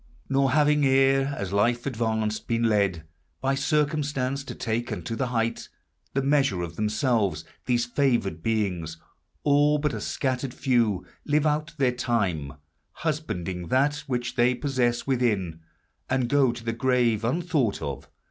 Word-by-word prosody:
Nor 135 0 +3
having 150 0 +4
e'er, 135 +1 +3
as 100 -1 -4
life 120 +4 +2
advanced, 110 -4 -1
been 115 0 0
led 100 -7 +2 0.4
By 135 0 0
circumstance 140 -2 0
to - - -7
take 115 +1 -2
unto 115 - -4
the 130 +2 -1
height 115 -1 -2 0.5
The 135 - +1
measure 135 -10 +2
of 85 -1 -6
themselves, 110 0 0 0.2
these 120 -1 +2
favored 120 - 0
beings, 90 -7 -1 0.5
All 145 +1 +4
but 150 -1 -1
a - - -4
scattered 130 -1 -2
few, 115 -8 +1 0.2
live 150 0 +1
out 150 +1 0
their 135 -3 +3
time, 100 - -1 0.5
Husbanding 95 - -2
that 140 - +2
which 120 -2 -2
they 125 0 +3
possess 120 -2 0
within, 105 -11 0 0.5
And 130 -2 +1
go 135 -1 +3
to 120 -1 -8
the 115 0 -2
grave, 120 -3 +1
unthought 140 - 0
of. 70 -2 -5
125 Hz, 145 wpm, -26 LUFS, 110-140 Hz, 0.5 s, having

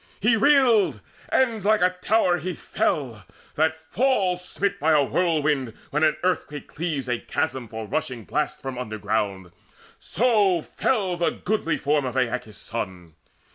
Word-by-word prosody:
He 225 +4 +3
reeled, 240 -4 +4 0.3
and 230 -6 +1
like 215 0 +3
a 185 0 +2
tower 185 -5 +2
he 180 +3 -4
fell, 120 -10 -2 0.3
that 160 +1 +1
falls 185 +1 0
Smit 200 +2 -2
by 160 +2 +3
a 150 -2 +5
whirlwind 145 -6 0 0.2
when 150 +2 +1
an 155 -1 +3
earthquake 165 -5 -1
cleaves 150 -5 -3
A 120 -1 -1
chasm 130 -3 -2
for 110 0 -6
rushing 125 -1 -3
blasts 150 +5 -2
from 135 -3 -6
underground; 105 -5 -2 0.5
So 205 -7 +2
fell 195 -8 -1
the 170 - +2
goodly 200 -4 -1
form 145 -1 +1
of 130 0 -3
Aeacus' 120 -4 -2
son. 95 -8 -6
155 Hz, 145 wpm, -24 LUFS, 125-190 Hz, 0.5 s, a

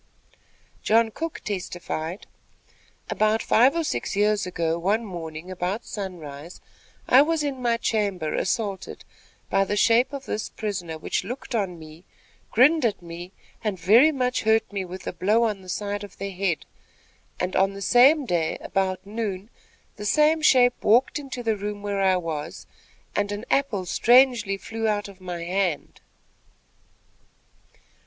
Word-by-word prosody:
John 225 +1 +3
Cook 330 +7 -5
testified: 180 -3 -5 0.9
"About 215 +1 +1
five 255 +7 +4
or 335 - 0
six 300 - -3
years 210 -1 +2
ago, 165 -2 -1
one 210 +6 0
morning, 170 -2 -7
about 185 +5 -3
sunrise, 170 -5 -7 0.5
I 260 - +7
was 315 +1 +1
in 275 -3 -3
my 235 -1 +1
chamber 200 -9 -1
assaulted 200 -1 -3 0.5
by 195 - +3
the 205 +1 -2
shape 230 +5 +4
of 275 -1 -7
this 215 - -3
prisoner, 185 -7 -4
which 155 - -2
looked 245 +5 -7
on 195 -6 -1
me, 160 +1 -13 0.5
grinned 290 +6 +4
at 215 -6 0
me, 170 +2 -8 0.3
and 210 -3 -1
very 225 - +6
much 255 -3 -1
hurt 220 -1 +2
me 195 -2 -2
with 185 +1 -9
a - - -4
blow 215 +5 +2
on 210 -4 -1
the 185 - -13
side 205 +1 -3
of 205 - -11
the 200 0 -4
head, 180 -4 -1 0.7
and 180 +1 -2
on 195 +1 +3
the 200 - -8
same 270 +6 +5
day, 170 -7 0
about 190 -1 -2
noon, 205 -1 -4 0.5
the 210 - -6
same 305 +7 +3
shape 245 -4 +4
walked 245 +7 +3
into 265 -3 -7
the 225 -2 +1
room 205 0 -5
where 200 -1 -1
I 190 -1 +3
was, 165 -3 -5 0.5
and 205 0 0
an 205 +3 -5
apple 240 -9 +1
strangely 240 -1 +4
flew 225 +2 -4
out 205 -1 0
of 195 -2 -14
my 175 -2 -5
hand." 180 -3 -2
205 Hz, 155 wpm, -24 LUFS, 185-230 Hz, 0.9 s, I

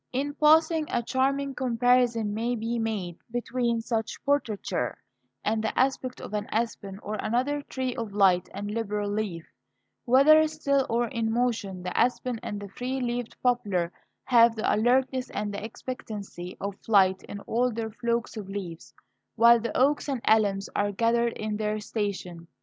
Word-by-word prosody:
In 280 +3 -2
passing, 315 +1 +4
a 240 - 0
charming 275 +3 0
comparison 245 -3 +2
may 235 +3 -1
be 230 +1 -2
made 200 -6 -3
between 240 0 -1
such 225 -1 -2
portraiture 220 - -1 0.5
and 220 +1 +1
the 220 - -2
aspect 260 -1 0
of - - -8
an 210 0 -2
aspen 215 -4 -2
or 210 0 -4
other 260 +6 0
tree 260 -3 -4
of 225 -3 -4
light 190 -3 +3
and 205 +1 -5
liberal 210 -2 -2
leaf; 205 -6 -3 0.6
whether 300 +5 +6
still 280 -3 0
or 235 +1 +1
in 230 -4 -1
motion 225 -6 -1
the 180 - -4
aspen 250 -1 +1
and 205 - -5
the 205 - -7
free 255 +6 -3
leafed 245 -1 -3
poplar 205 -9 +1 0.3
have 235 -2 +5
the 220 - +1
alertness 255 +3 +2
and 205 -1 -3
expectancy 205 -4 -7
of 200 0 -4
flight 190 -3 +4
in 205 - -7
all 245 +4 0
their 225 -1 -4
flocks 235 +2 -2
of 205 -3 -7
leaves, 185 -5 -7 0.4
while 235 +1 +7
the 230 -1 -3
oaks 285 +3 +2
and 265 -4 -2
elms 200 -3 +3
are 205 0 +1
gathered 230 +3 +1
in 215 -1 -3
their 215 0 -1
station. 195 -6 -4
230 Hz, 160 wpm, -27 LUFS, 205-250 Hz, 0.6 s, while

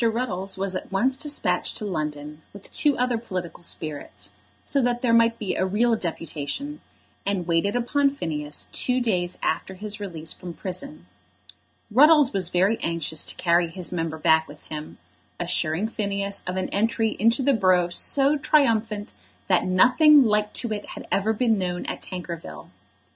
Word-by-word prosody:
Ruddles 195 -5 -2
was 190 -1 -2
at 185 - -6
once 250 +7 +1
despatched 295 +2 -1
to 215 - -3
London 150 -4 -4
with 200 -1 -12
two 290 -2 +2
other 245 -2 0
political 185 -7 -6
spirits, 155 -3 -4 0.3
so 280 - 0
that 245 0 0
there 235 -2 +3
might 230 0 +4
be 210 -4 -3
a - - 0
real 225 +5 +2
deputation, 170 - -4 0.4
and 195 -3 -1
waited 170 +6 +1
upon 280 +4 +2
Phineas 150 - -4
two 255 0 0
days 180 -7 -1
after 190 - -1
his 210 +2 -4
release 165 -6 -4
from 175 -2 -9
prison. 240 +11 -7 0.9
Ruddles 290 +2 +6
was 185 -3 0
very 190 +6 +2
anxious 165 -2 +1
to - - -1
carry 170 0 +2
his 175 +1 0
member 165 -2 -3
back 160 0 +3
with 150 - -13
him, 155 0 -7 0.4
assuring 160 +7 0
Phineas 200 -2 -2
of 180 +1 -2
an 185 - -2
entry 225 +1 0
into 230 +5 +3
the 280 +1 +3
borough 185 -5 +3
so 275 +10 +3
triumphant 225 -8 +1 0.4
that - - +3
nothing 265 - +6
like 210 -1 +1
to 235 -3 0
it 205 - -4
had - - -9
ever 200 +3 +2
been 225 -1 +1
known 180 -1 -3
at - - -5
Tankerville. 170 - -7
200 Hz, 165 wpm, -24 LUFS, 175-235 Hz, 0.9 s, Ruddles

